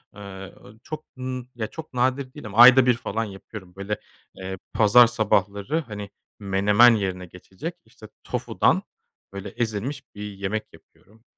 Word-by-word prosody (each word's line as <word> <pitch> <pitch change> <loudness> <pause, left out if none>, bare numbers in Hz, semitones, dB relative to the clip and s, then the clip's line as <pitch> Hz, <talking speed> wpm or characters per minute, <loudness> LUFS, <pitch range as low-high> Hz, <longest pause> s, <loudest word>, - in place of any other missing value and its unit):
Eee, 95 -2 -9
o - - -15
çok 155 0 -7
n 130 -1 -5 0.3
çok 160 -4 -9
nadir 130 +1 0
değil 150 -6 -10
ama 105 +2 -8
ayda 130 +1 +9
1 125 - +5
falan 115 +1 -3
yapıyorum. 95 -2 -10
Böyle, 100 +2 -4 0.4
eee, 95 0 -6 0.2
pazar 115 +2 +7
sabahları 105 - 0
hani 105 -2 -7 0.3
menemen 105 +4 +5
yerine 95 -3 -3
geçecek, 90 +2 -8
işte, - - -15 0.2
tofudan, - - +1 0.5
böyle, 100 +1 -6
ezilmiş 120 +5 -3
bir 105 - -9
yemek 100 +1 -4
yapıyorum. 110 +3 -22
105 Hz, 140 wpm, -24 LUFS, 100-125 Hz, 0.5 s, ayda